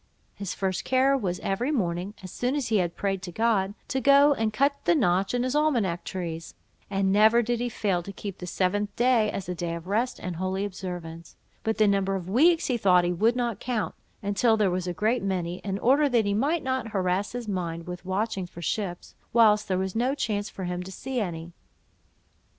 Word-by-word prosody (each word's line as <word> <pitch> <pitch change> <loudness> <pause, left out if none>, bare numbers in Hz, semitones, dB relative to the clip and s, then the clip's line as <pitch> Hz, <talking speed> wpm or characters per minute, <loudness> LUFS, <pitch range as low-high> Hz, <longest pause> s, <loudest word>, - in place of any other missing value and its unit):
His 200 -3 -5
first 190 -2 -1
care 265 +1 +3
was 190 -9 -2
every 215 +8 -1
morning, 190 - -1
as 185 - -8
soon 250 +3 -1
as 280 -5 -2
he 220 - +3
had 175 -3 0
prayed 195 -2 -1
to 185 -2 -6
God, 205 -1 +1
to 265 - -1
go 280 +3 +6
and 225 -4 -1
cut 275 +6 +2
the 345 - +4
notch 195 - +2
in 245 - +1
his 255 0 -1
almanack 240 - +1
trees; 165 -3 -5 0.3
and 195 -1 +1
never 220 +4 +5
did 240 +1 -1
he 245 0 -1
fail 195 -5 0
to 200 - -8
keep 200 -1 -7
the 180 - -6
seventh 200 +3 -1
day 240 -3 +3
as 190 - -5
a 180 - -2
day 170 -1 -3
of 170 0 -8
rest 220 +6 0
and 180 -2 -5
holy 190 +2 -1
observance; 175 -4 -7 0.3
but 220 0 -1
the 215 - +4
number 195 -1 +1
of 180 -2 -5
weeks 320 - +4
he 250 - 0
thought 180 -5 +4
he 175 0 0
would 225 +7 +2
not 240 -4 -1
count, 240 -4 -2 0.3
until 220 +3 +2
there 205 -4 +2
was 180 0 -2
a - - 0
great 215 +8 0
many, 180 -3 -2
in 195 -1 -3
order 280 +7 +3
that 235 -4 +2
he 200 - +1
might 290 +10 +1
not 260 -2 -1
harass 190 +2 0
his 245 -2 -5
mind 170 -4 -3
with 180 0 -7
watching 190 0 -2
for 170 0 -10
ships, 175 +1 -3 0.2
whilst 215 -3 +5
there 185 -2 0
was 190 +1 -2
no 250 +4 +1
chance 210 -6 -2
for 190 - -7
him 180 0 -3
to 185 +1 -8
see 260 +5 -4
any. 170 -5 -4
200 Hz, 220 wpm, -26 LUFS, 180-240 Hz, 0.3 s, go